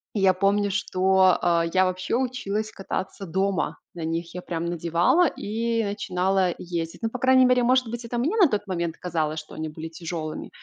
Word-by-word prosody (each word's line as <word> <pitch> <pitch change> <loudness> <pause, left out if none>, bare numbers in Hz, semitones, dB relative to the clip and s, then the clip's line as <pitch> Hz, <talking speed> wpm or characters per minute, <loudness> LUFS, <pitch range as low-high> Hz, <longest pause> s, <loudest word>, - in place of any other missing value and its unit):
И - - +1
я 190 -1 +5
помню, 200 +2 +2
что, 190 -1 +3
э, 170 -1 +2
я 185 0 +5
вообще 185 +3 -1
училась 220 -5 -2
кататься 195 0 -5
дома 190 +3 -1 0.2
на 165 -2 -4
них. 165 +1 -3
Я 180 - -4
прям 170 -1 -4
надевала 175 - +2
и 230 +2 -1
начинала 190 -2 0
ездить. 170 -2 -4
Ну, 225 - +1
по 250 - -6
крайней 260 0 +5
мере, 250 -1 +4
может 255 0 +3
быть, 235 +1 -5
это 240 +1 -4
мне 305 - 0
на 350 - +8
тот 210 -4 -2
момент 170 -3 -2
казалось, 160 -3 -2
что 155 - -12
они 155 0 -4
были 160 +1 -7
тяжёлыми, 160 -1 -5
190 Hz, 190 wpm, -25 LUFS, 170-225 Hz, 0.2 s, на